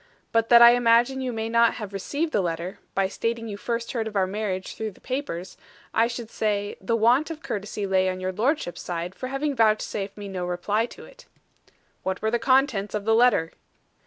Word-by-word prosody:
But 230 Hz, 0 st, +2 dB
that 235 Hz, 0 st, +9 dB
I 235 Hz, -, +10 dB
imagine 240 Hz, +2 st, +3 dB
you 255 Hz, -1 st, -2 dB
may 225 Hz, -1 st, -3 dB
not 235 Hz, 0 st, +3 dB
have 210 Hz, -4 st, -7 dB
received 290 Hz, -, -2 dB
the 205 Hz, -, +2 dB
letter, 170 Hz, +1 st, -4 dB, 0.2 s
by 195 Hz, -1 st, +2 dB
stating 230 Hz, +3 st, -3 dB
you 205 Hz, -, -5 dB
first 235 Hz, +3 st, -3 dB
heard 225 Hz, -3 st, -2 dB
of 215 Hz, -, -8 dB
our 195 Hz, -1 st, +3 dB
marriage 190 Hz, -1 st, -3 dB
through 220 Hz, -1 st, -4 dB
the -, -, -21 dB
papers, 255 Hz, -10 st, -5 dB, 0.4 s
I 225 Hz, +1 st, +3 dB
should 235 Hz, -1 st, -6 dB
say, 205 Hz, -1 st, -1 dB
the 210 Hz, +5 st, 0 dB
want 240 Hz, +7 st, +3 dB
of 315 Hz, -2 st, -7 dB
courtesy 205 Hz, 0 st, -4 dB
lay 190 Hz, -1 st, +2 dB
on 185 Hz, 0 st, -4 dB
your 185 Hz, 0 st, -2 dB
lordship's 220 Hz, -, -1 dB
side 175 Hz, +1 st, -4 dB
for 255 Hz, -, -6 dB
having 275 Hz, +2 st, -2 dB
vouchsafed 215 Hz, -3 st, +1 dB
me 205 Hz, -1 st, -7 dB
no 190 Hz, -2 st, -4 dB
reply 200 Hz, +6 st, 0 dB
to -, -, -12 dB
it." -, -, -17 dB, 0.7 s
"What 190 Hz, -1 st, -2 dB
were 220 Hz, -, -1 dB
the 240 Hz, -, +1 dB
contents 255 Hz, -5 st, +2 dB
of 205 Hz, -1 st, -3 dB
the 225 Hz, -, +3 dB
letter?" 225 Hz, -8 st, +4 dB
220 Hz, 210 wpm, -25 LUFS, 195-240 Hz, 0.7 s, I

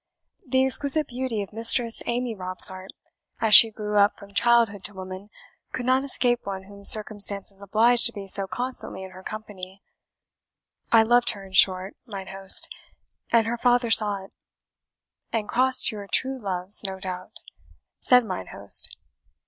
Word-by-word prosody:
The 260 Hz, 0 st, 0 dB
exquisite 280 Hz, +3 st, 0 dB
beauty 245 Hz, -4 st, -5 dB
of 200 Hz, -, -15 dB
Mistress 230 Hz, +1 st, +4 dB
Amy 240 Hz, 0 st, -4 dB
Robsart, 185 Hz, 0 st, +4 dB, 0.5 s
as 220 Hz, -2 st, -1 dB
she 225 Hz, -, +10 dB
grew 210 Hz, -1 st, -4 dB
up 200 Hz, +1 st, +1 dB
from 200 Hz, 0 st, -17 dB
childhood 230 Hz, -4 st, 0 dB
to 205 Hz, -, -6 dB
woman, 185 Hz, +2 st, -11 dB, 0.4 s
could 250 Hz, -, -6 dB
not 260 Hz, +1 st, 0 dB
escape 245 Hz, -3 st, -2 dB
one 195 Hz, -1 st, -8 dB
whom 200 Hz, +1 st, -17 dB
circumstances 205 Hz, -2 st, +1 dB
obliged 230 Hz, +5 st, +1 dB
to -, -, -7 dB
be 200 Hz, -3 st, -10 dB
so 195 Hz, 0 st, -4 dB
constantly 245 Hz, -3 st, -5 dB
in 190 Hz, -, -12 dB
her 185 Hz, 0 st, -14 dB
company 195 Hz, -2 st, -11 dB, 1.1 s
I 225 Hz, -1 st, +4 dB
loved 240 Hz, +1 st, +1 dB
her, 200 Hz, -2 st, -13 dB
in 190 Hz, -, -17 dB
short, 185 Hz, 0 st, +1 dB
mine 195 Hz, -3 st, -10 dB
host, 195 Hz, 0 st, +4 dB, 0.6 s
and 230 Hz, -1 st, +1 dB
her 235 Hz, +1 st, -4 dB
father 245 Hz, -1 st, 0 dB
saw 205 Hz, -3 st, +4 dB
it." -, -, -21 dB, 1.0 s
"And 220 Hz, -2 st, -4 dB
crossed 255 Hz, +1 st, 0 dB
your 205 Hz, -2 st, -10 dB
true 265 Hz, 0 st, -3 dB
loves, 190 Hz, -1 st, -2 dB
no 190 Hz, -1 st, -7 dB
doubt?" 185 Hz, -1 st, -9 dB, 0.7 s
said 250 Hz, -2 st, +2 dB
mine 140 Hz, -, -8 dB
host. -, -, -1 dB
210 Hz, 155 wpm, -22 LUFS, 195-240 Hz, 1.1 s, she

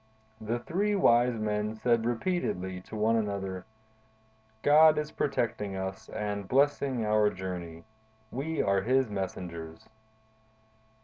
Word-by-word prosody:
The 110 Hz, +2 st, -1 dB
three 200 Hz, +11 st, -1 dB
wise 120 Hz, -9 st, +4 dB
men 105 Hz, 0 st, -1 dB
said 115 Hz, 0 st, +1 dB
repeatedly 115 Hz, -, -2 dB
to -, -, -7 dB
one 110 Hz, +2 st, +2 dB
another: 100 Hz, -4 st, -2 dB, 1.0 s
'God 155 Hz, +1 st, +7 dB
is 150 Hz, 0 st, -2 dB
protecting 105 Hz, -9 st, -1 dB
us 95 Hz, +3 st, -5 dB
and 105 Hz, -2 st, -4 dB
blessing 135 Hz, -2 st, +2 dB
our 105 Hz, 0 st, +3 dB
journey. 90 Hz, -4 st, -6 dB, 0.5 s
We 155 Hz, +5 st, -2 dB
are 100 Hz, -1 st, +2 dB
His 130 Hz, +2 st, +1 dB
messengers. 85 Hz, -4 st, -6 dB
110 Hz, 115 wpm, -29 LUFS, 95-130 Hz, 1.0 s, God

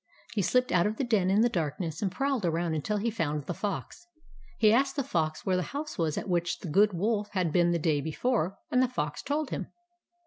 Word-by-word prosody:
He 210 Hz, -, +1 dB
slipped 250 Hz, +7 st, +2 dB
out 180 Hz, +1 st, +4 dB
of 215 Hz, +1 st, -3 dB
the -, -, 0 dB
den 215 Hz, -7 st, +2 dB
in 200 Hz, +3 st, +4 dB
the 235 Hz, -, +5 dB
darkness, 165 Hz, -5 st, -3 dB
and 195 Hz, -3 st, 0 dB
prowled 270 Hz, -2 st, -1 dB
around 165 Hz, -2 st, 0 dB
till 210 Hz, -, 0 dB
he 225 Hz, +3 st, 0 dB
found 150 Hz, -8 st, -2 dB
the 175 Hz, -, -3 dB
Fox. 215 Hz, -, -5 dB, 0.5 s
He 215 Hz, -1 st, +5 dB
asked 270 Hz, +3 st, +2 dB
the 280 Hz, -, 0 dB
Fox 155 Hz, -, -1 dB
where 190 Hz, -, +2 dB
the -, -, +1 dB, 0.2 s
house 300 Hz, +1 st, -4 dB
was 160 Hz, -3 st, 0 dB
at -, -, -3 dB
which 175 Hz, -2 st, 0 dB
the 175 Hz, -, -5 dB
Good 205 Hz, +6 st, +4 dB
Wolf 210 Hz, +3 st, 0 dB
had 180 Hz, -5 st, 0 dB
been 175 Hz, -1 st, +4 dB
the 175 Hz, -, +2 dB
day 155 Hz, -3 st, +1 dB
be 160 Hz, -, -4 dB
fore, 200 Hz, -2 st, 0 dB
and 250 Hz, -, +4 dB
the 255 Hz, -, +4 dB
Fox 150 Hz, -12 st, -3 dB
told 290 Hz, 0 st, -2 dB
him. -, -, -3 dB
195 Hz, 240 wpm, -29 LUFS, 165-235 Hz, 0.5 s, the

